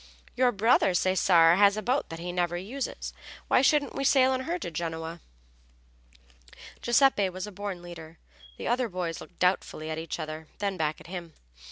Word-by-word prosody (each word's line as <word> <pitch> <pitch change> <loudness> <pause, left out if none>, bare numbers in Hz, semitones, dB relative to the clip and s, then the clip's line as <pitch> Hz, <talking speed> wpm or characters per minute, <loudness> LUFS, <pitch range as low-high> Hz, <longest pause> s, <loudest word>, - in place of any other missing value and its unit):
Your 250 0 +3
brother, 210 -3 +3
Cesare, 180 -2 +4
has 200 +1 +5
a 215 - -3
boat 255 +4 0
that 165 - -6
he 175 +1 -5
never 175 -1 -1
uses. 240 +9 -5 0.3
Why - - +4
shouldn't 285 +1 +3
we 275 - -3
sail 265 -1 +4
in 260 - -1
her 345 - 0
to 250 - -6
Genoa?" 165 0 -5 1.6
Giuseppe 240 -5 +3
was 185 +1 -5
a 210 - -8
born 195 -2 -6
leader. 165 -2 -10 0.4
The - - -5
other 245 0 +1
boys 175 -3 -4
looked 180 - -13
doubtfully 180 -3 0
at 155 - -3
each 165 +1 -5
other, 155 0 -6
then 200 -1 -2
back 155 -3 -1
at - - -14
him. 170 -2 -7
185 Hz, 180 wpm, -28 LUFS, 165-240 Hz, 1.6 s, has